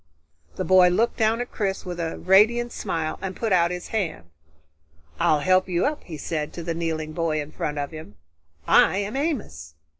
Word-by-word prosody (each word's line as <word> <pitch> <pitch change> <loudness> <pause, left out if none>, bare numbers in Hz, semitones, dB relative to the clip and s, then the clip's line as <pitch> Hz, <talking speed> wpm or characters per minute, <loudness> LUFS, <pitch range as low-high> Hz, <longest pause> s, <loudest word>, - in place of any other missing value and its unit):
The - - -3
boy 185 -1 +6
looked 215 +7 +1
down 225 +1 +2
at 245 - -6
Chris 195 -3 -2
with 175 -1 -5
a 165 -1 -3
radiant 225 +6 +4
smile 160 -1 -3
and 190 -1 -4
put 225 -4 -1
out 170 -1 +4
his 180 0 -6
hand. 160 - -3 0.9
"I'll 150 -1 +3
help 185 +3 +3
you 175 -1 +1
up," 300 +1 -2
he 160 -3 -7
said 150 0 -4
to 170 - -6
the 165 0 -2
kneeling 160 -2 -3
boy 160 -2 -1
in 145 0 -6
front 150 -1 -4
of 145 -1 -3
him. 155 -10 -10 0.5
"I - - +5
am 205 +4 -3
Amos." 205 - -3
175 Hz, 190 wpm, -24 LUFS, 155-205 Hz, 0.9 s, boy